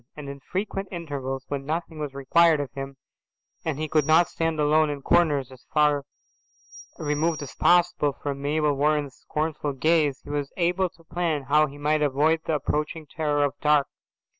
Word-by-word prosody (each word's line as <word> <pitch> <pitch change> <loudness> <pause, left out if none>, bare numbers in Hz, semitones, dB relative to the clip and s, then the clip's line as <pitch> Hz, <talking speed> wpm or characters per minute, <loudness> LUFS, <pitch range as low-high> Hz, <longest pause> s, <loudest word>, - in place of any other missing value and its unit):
And 150 -2 -7
in 140 0 -7
the - - -36
frequent 195 +1 -3
intervals 140 -6 -5
when 140 -1 -3
nothing 160 +2 -4
was 145 -3 -5
required 160 +3 +4
of 140 -4 -4
him 135 0 -7 0.7
and 160 -4 -2
he 155 +1 -2
could 155 0 +1 0.2
stand 165 -1 -2
alone 155 +1 +3
in 145 -2 -5
corners 150 -7 +2
as 130 -1 -16
far 150 -2 +2 0.9
removed 155 +1 -1
as 135 - -9
possible 175 -4 +3
from 140 -1 -3
Mabel 150 +1 +1
Warren's 145 -1 +1
scornful 150 -2 -3
gaze, 150 0 +2
he - - -8
was 145 -1 -2
able 180 +1 +1
to 165 - -23
plan 165 -3 -1
how 150 +3 +3
he 140 0 -11
might 150 +1 +1
avoid 150 +3 +2
the 160 - 0
approaching 150 +2 -2
terror 150 -1 0
of 145 -1 0
the - - -21
dark. 150 -2 +4
150 Hz, 180 wpm, -25 LUFS, 140-160 Hz, 0.9 s, required